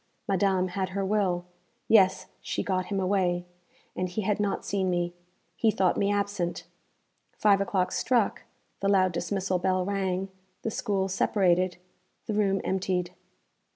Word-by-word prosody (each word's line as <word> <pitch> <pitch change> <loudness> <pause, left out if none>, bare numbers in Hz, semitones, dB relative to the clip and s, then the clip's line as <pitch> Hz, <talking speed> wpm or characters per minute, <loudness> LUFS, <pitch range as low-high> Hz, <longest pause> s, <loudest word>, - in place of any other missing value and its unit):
Madame 190 -1 +2
had 185 +1 -2
her 195 - 0
will. 190 -4 +1 0.4
Yes, 190 -4 +5 0.2
she - - -2
got 185 -2 -1
him 200 -2 -1
away, 185 -2 +1 0.5
and 185 0 -2
he 205 +4 -3
had 210 +1 0
not 205 -1 -1
seen 190 -2 0
me. 175 -1 0 0.4
He 225 - +2
thought 190 -4 +2
me 200 0 +1
absent. 200 -4 -1 0.7
Five 200 -2 +4
o'clock 190 -2 0
struck, 240 -5 +1 0.4
the 200 - 0
loud 185 -2 +4
dismissal 185 +2 -1
bell 185 0 +1
rang, 195 -1 -1 0.3
the 225 - -1
school 200 -4 -1
separated, 185 -2 +2 0.5
the 220 - -2
room 195 -2 +2
emptied. 185 -2 -1
190 Hz, 145 wpm, -28 LUFS, 185-200 Hz, 0.7 s, Yes